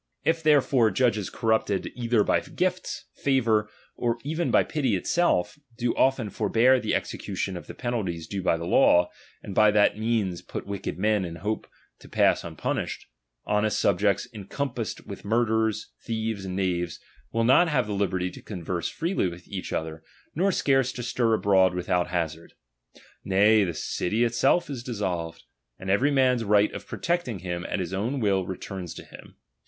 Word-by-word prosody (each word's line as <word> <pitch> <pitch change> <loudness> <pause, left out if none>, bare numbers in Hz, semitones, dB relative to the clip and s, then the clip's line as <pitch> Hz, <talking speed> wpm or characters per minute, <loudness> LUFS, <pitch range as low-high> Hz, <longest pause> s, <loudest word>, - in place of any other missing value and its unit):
If 165 0 +2
therefore 140 -6 +4
judges 110 -5 +1
corrupted 110 -4 0
'^j'"*^'''^ - - -6
either 115 -3 +2
by - - +2
gifts, 185 0 -3
favour, 115 -6 +2 0.3
or 120 -1 0
even 160 +4 -1
by - - +4
pity 130 -9 0
itself, 105 - +1 0.2
do 120 0 0
often 130 -6 +2
forbear 115 +4 +3
the - - -1
execution 95 - -3
of 90 - -8
the - - -9
penalties 100 -10 -3
due 100 +4 -4
by 85 -2 +2
the 85 - -5
law, 90 0 +4 0.3
and 100 - -6
by 105 +2 +5
that 105 0 +3
means 110 -6 0
put - - -7
wicked 100 -3 -4
men 105 +1 +2
in 85 -2 -5
hope 105 +6 -3 0.3
to - - -15
pass - - +3
unpunished: - - -3 0.4
honest 105 +1 +1
subjects 100 +1 +2
encom 120 +6 -4
passed 115 -4 -4
with - - -8
murderers, 110 0 0
thieves, 110 -3 -3
and 90 -1 -4
knaves, 90 -3 -1 0.3
will 115 0 +1
not 130 +9 +5
have 135 -6 +1
the 105 - -4
liberty 95 -2 -1
to - - -11
converse 90 -3 -4
freely 165 - -1
with 85 0 -8
each 95 -2 -6
other, 80 0 -3 0.3
nor 190 +5 +2
scarce 135 -6 +2
to 120 - -5
stir 115 -2 +1
abroad 95 -3 +3
without 90 0 0
hazard; 85 -2 -3 0.7
nay, 105 +3 +4
the 85 -4 -2
city 110 +9 -1
itself 135 +8 +2
is 135 -5 -5
dissolved, 95 -9 -4 0.3
and 95 0 -3
every 125 +9 +3
man's 130 -4 +3
right 105 0 +3
of - - -8
protecting 170 - -2
himself 90 -1 -4
at - - 0
his 90 0 -4
own 115 +9 -1
will 95 -5 +1
returns 95 -2 -6
to - - -9
him. - - -14
105 Hz, 170 wpm, -26 LUFS, 95-125 Hz, 0.7 s, by